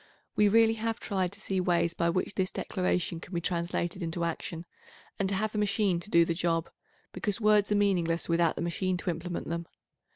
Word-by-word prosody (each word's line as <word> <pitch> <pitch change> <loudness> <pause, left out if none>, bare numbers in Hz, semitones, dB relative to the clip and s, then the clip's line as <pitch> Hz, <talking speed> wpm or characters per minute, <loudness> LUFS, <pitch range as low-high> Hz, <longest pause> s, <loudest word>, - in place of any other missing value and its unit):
We 210 - +4
866 205 - +3 0.3
really 225 - -2
have 225 0 -1
tried 190 -3 -1
to 200 - -11
see 195 -3 -1
ways 170 -2 +2
by 170 0 +1
which 185 +3 -1
this 190 -1 0
declaration 180 -3 -1
can 175 +2 -9
be - - +1
translated 170 +1 -2
into 170 0 -2
action, 170 0 -4 0.5
and 195 -1 +1
to 195 - 0
have 215 +2 -1
a 210 - -1
machine 200 -3 +1
to 175 - -5
do 170 -3 +5
the 170 - 0
job, 165 -1 0 0.4
because 195 +3 -2
words 210 -1 +4
are - - +4
meaningless 175 -5 +1
without 170 -1 +2
the - - -3
machine 180 +2 -1
to 180 - -1
implement 170 +1 -5
them. 170 0 -3
180 Hz, 215 wpm, -29 LUFS, 170-200 Hz, 0.5 s, do